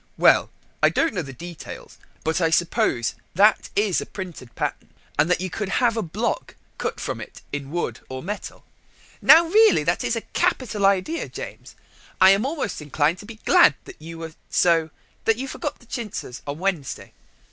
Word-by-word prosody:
"Well, - - +5 0.3
I - - +6
don't 325 - +1
know 185 - -1
the 140 -4 -8
details, 170 +5 -10 0.2
but 160 +3 0
I 165 - +3
suppose 165 - +1 0.2
that 205 +4 +4
is 205 -3 +2
a - - -5
printed 175 - -8
pattern, - - -3 0.3
and 170 - +4
that 180 - +2
you 185 -1 -3
could 210 +1 -3
have 235 +2 +2
a 225 - 0
block 210 +6 -3 0.2
cut - - -3
from - - -4
it - - -11
in 140 -1 -4
wood 175 +3 -3
or 130 0 -6
metal." 205 +3 -6 0.6
"Now, 330 +2 +8
really, 430 +6 +5
that - - 0
is - - 0
a - - -2
capital 210 -6 0
idea, 200 - 0
James. - - -9 0.4
I 190 +1 +8
am 200 +6 +2
almost 280 - -3
inclined 150 +4 0
to 205 - -11
be 225 -1 -11
glad 145 - +6
that - - -13
you 165 +1 -8
were 165 -1 -7 0.2
so 165 -2 +3 0.4
that 225 -1 +3
you 265 +2 -4
forgot 295 +2 -4
the 240 - -20
chintzes 220 - -6
on 145 +1 -3
Monday. 175 -6 -3
185 Hz, 185 wpm, -23 LUFS, 160-225 Hz, 0.6 s, Now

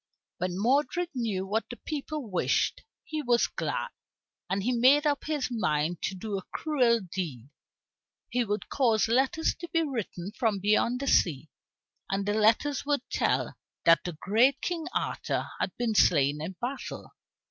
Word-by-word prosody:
When 180 0 -2
Modred 280 - +1
knew 220 -7 -2
what 215 +4 -2
the 245 - -6
people 300 -1 -5
wished, 185 -4 0 0.2
he 310 -1 -4
was 240 -3 +3
glad, - - -3 0.6
and 195 +1 -1
he 245 - +1
made 260 +5 +5
up 290 -1 +1
his 300 -4 -1
mind 165 -7 0
to 190 - -2
do 200 +1 -3
a 190 - -16
cruel 250 -7 +2
deed. 165 - -5 0.8
He 245 - 0
would 210 -1 -3
cause 230 -6 +2
letters 265 +7 +2
to 345 - -7
be 330 -1 +2
written 215 - -4
from 220 -2 0
beyond 215 +5 +2
the 275 - -3
sea, 155 - +2 0.6
and 195 0 -1
the 205 - 0
letters 225 +7 +2
would 285 -3 -1
tell - - 0 0.3
that 165 0 +6
the 175 - -4
great 225 - +3
King 335 -2 -2
Arthur - - -2
had - - -2
been 235 -2 0
slain 150 -7 +3
in 170 +5 -4
battle. 260 +3 -5
225 Hz, 160 wpm, -28 LUFS, 190-275 Hz, 0.8 s, that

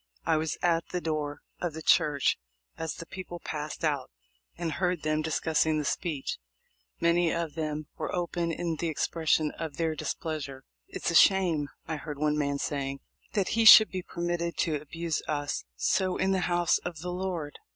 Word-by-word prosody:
I - - +3
was 155 0 -1
at 170 -1 +2
the 180 - -2
door 155 -3 -3 0.2
of 175 -3 -2
the 160 0 -7
church 145 -3 +3 0.4
as 160 -3 -4
the 165 - -8
people 180 -1 -7
passed 150 0 -5
out, 145 -4 0 0.5
and 170 -1 -2
heard 180 +1 -1
them 155 0 +1
discussing 160 0 +1
the 150 - -1
speech. 150 - -2 0.6
Many 170 0 +3
of 170 -3 -2
them 155 -1 -3
were - - -2
open 175 -1 -1
in 165 -1 -2
the 170 - -1
expression 160 0 +1
of 155 -3 -5
their 165 -1 0
displeasure. 150 -4 -4 0.2
"It's - - -2
a - - -3
shame," 175 -7 +5 0.2
I 160 - -2
heard 150 -1 -6
one 150 +1 +1
man 140 -1 0
say, 140 -1 -2 0.4
"that 200 -3 +1
he 225 +1 +2
should 220 0 +10
be 185 -1 -3
permitted 170 -1 -3
to 160 - 0
abuse 165 +1 -3
us 145 -2 -2
so 185 - +1
in 190 +1 +1
the 190 - +2
house 175 -1 +3
of 170 -3 -6
the 180 +1 -4
Lord." 175 -5 -4
160 Hz, 180 wpm, -29 LUFS, 150-175 Hz, 0.6 s, should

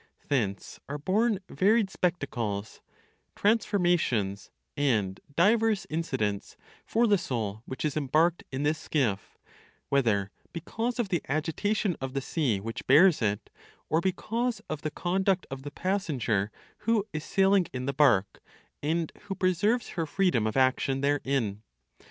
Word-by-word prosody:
Thence 105 -8 -1
are 145 - -3
born 205 +8 +1
varied 205 +1 +2
spectacles, 120 - -2 0.5
transformations 175 - +1 0.3
and 105 -10 +1 0.2
divers 215 +4 +3
incidents 130 -11 -2 0.3
for 235 +2 +3
the 205 -4 +4
soul 110 -8 -3
which 130 - -4
is 150 - -1
embarked 155 +4 +2
in 135 +2 -2
this 150 +1 +1
skiff; 120 -12 -1 0.5
whether 110 -8 +2 0.2
because 225 +8 -3
of 235 -5 -1
the 175 -4 0
agitation 175 +6 0
of 135 0 -4
the - - +2
sea 135 - 0
which 115 +3 -6
bears 155 +4 +6
it, 105 -1 -1 0.4
or 160 +2 +2
because 225 +5 -1
of 155 -2 -3
the 155 - -2
conduct 190 +3 0
of 135 0 -5
the 145 - -6
passenger 145 - -1 0.3
who 220 -2 +1
is 155 0 -3
sailing 195 -1 +3
in 125 0 -4
the 140 - -1
bark, 120 -9 +3 0.4
and 160 +2 -1
who 195 -1 -4
preserves 205 +7 +1
her 165 -3 -3
freedom 175 - +1
of 110 - -2
action 130 +1 +2
therein. 135 -7 0
155 Hz, 140 wpm, -28 LUFS, 125-190 Hz, 0.5 s, bears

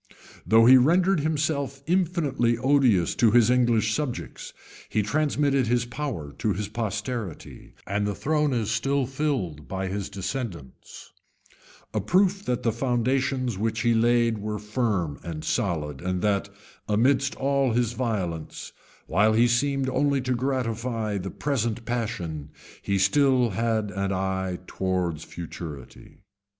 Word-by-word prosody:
Though 115 +1 +6
he 130 +2 +9
rendered 175 +7 +3
himself 145 -3 -1
infinitely 160 -9 +1
odious 125 - +3
to 115 - +5
his 120 +1 +5
English 120 -3 +2
subjects, 145 -3 -4 0.4
he 105 - +1
transmitted 140 +1 +1
his 120 0 +1
power 120 - -5
to 110 -3 +1
his 100 +2 -3
posterity, 110 - -5
and 105 +2 -1
the 100 - -2
throne 150 +2 +1
is 110 -4 -1
still 135 +3 +1
filled 125 - -2
by 95 +7 -3
his 100 0 -3
descendants; 95 - -6 0.8
a - - 0
proof 195 +1 +2
that 125 -1 -1
the 115 - +2
foundations 130 -1 0
which 110 +1 -1
he 120 - +3
laid 115 -1 +2
were 105 +1 -3
firm 105 - -1
and 80 -2 -6
solid, 80 - -1
and 90 0 -2
that, 100 -1 +1 0.4
amidst 130 +5 +2
all 135 -2 +1
his 120 -1 +1
violence, 100 -10 -3 0.3
while 105 +5 +3
he 115 +2 +4
seemed 135 +3 +1
only 140 +1 +1
to 130 0 -1
gratify 115 -4 -2
the 95 +1 -5
present 120 -5 -2
passion, 90 -11 -3 0.3
he 100 - -2
had 95 - +2
still 125 +3 +3
an 105 -2 -1
eye 95 -1 -1
towards 90 -5 -2
futurity. 80 -1 -9
115 Hz, 135 wpm, -25 LUFS, 100-130 Hz, 0.8 s, he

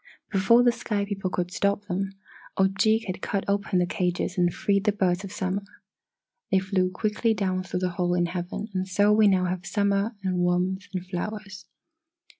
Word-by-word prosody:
"Before 215 +5 +5
the 245 - +5
sky 220 -3 -2
people 195 -2 -3
could 180 -1 -2
stop 200 +1 0
them, 195 +1 -2 0.4
Ojeeg 200 +4 +3
had 185 -1 -5
cut 200 -1 -2
open 200 -1 0
the 180 - +3
cages 180 0 -1
and 175 -2 +2
freed 200 +2 0
the 210 - +4
Birds 190 -2 0
of 195 - -7
Summer. 190 0 -2 0.9
They 190 - +3
flew 190 -1 +1
quickly 215 +4 0
down 185 -3 0
through 185 0 -4
the 185 - +1
hole 175 0 0
in 175 -1 +2
heaven 180 +4 -4
and 185 0 -1
so 205 +2 +3
we 215 0 +5
now 185 -2 +3
have 180 0 -2
summer 200 +3 0
and 185 -1 0
warmth 180 +2 0
and 180 0 -3
flowers. 200 +1 -6
190 Hz, 185 wpm, -26 LUFS, 185-205 Hz, 0.9 s, Before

